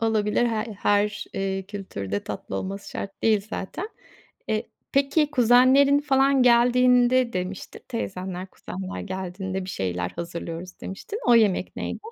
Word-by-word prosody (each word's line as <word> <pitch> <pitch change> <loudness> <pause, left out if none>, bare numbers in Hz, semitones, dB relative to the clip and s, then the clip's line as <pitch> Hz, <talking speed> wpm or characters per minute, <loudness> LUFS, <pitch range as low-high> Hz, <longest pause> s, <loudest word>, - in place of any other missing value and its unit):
olabilir. 220 0 +2
H 230 - 0
ya, 215 +1 -1 0.2
her, 205 0 +2
eee, 195 0 -2
kültürde 100 - -5
tatlı 100 -1 -5
olması 195 - -5
şart 195 0 -7
değil 215 -2 +2
zaten. 345 - -5 0.6
E, 215 0 +1 0.3
peki 280 +2 +2
kuzenlerin 260 +2 +5
falan 275 -2 +3
geldiğinde 250 0 +4
demiştin 185 +1 -5
teyzenler, 185 -5 -4
kuzenler 190 0 -7
geldiğinde 190 0 -4
bir 185 - -6
şeyler 90 - -2
hazırlıyoruz 170 +1 -7
demiştin. 200 - -6
O 240 - +6
yemek 210 -5 +2
neydi? - - -4
205 Hz, 135 wpm, -25 LUFS, 185-245 Hz, 0.6 s, O